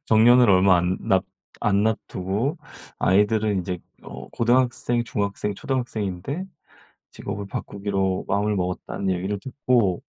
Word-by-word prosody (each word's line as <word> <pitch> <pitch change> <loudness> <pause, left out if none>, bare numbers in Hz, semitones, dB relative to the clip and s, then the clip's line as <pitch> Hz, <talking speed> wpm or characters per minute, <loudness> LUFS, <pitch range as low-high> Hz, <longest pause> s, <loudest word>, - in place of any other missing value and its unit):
정년을 120 +2 +6
얼마 95 0 +5
안 90 +2 0
놨 95 -1 +2 0.4
안 100 -1 +2
놨두고 110 - -1 0.4
아이들은 105 +1 +2
이제 90 0 -4 0.2
어 - - -9
고등학생, 120 0 +1
중학생, 105 -2 -2
초등학생인데 120 - -3 0.7
직업을 100 0 -6
바꾸기로 100 -1 -2
마음을 105 +1 +1
먹었다는 90 +1 -3
얘기를 95 +3 -2
듣고 120 -7 0
100 Hz, 295 characters per minute, -24 LUFS, 95-120 Hz, 0.7 s, 정년을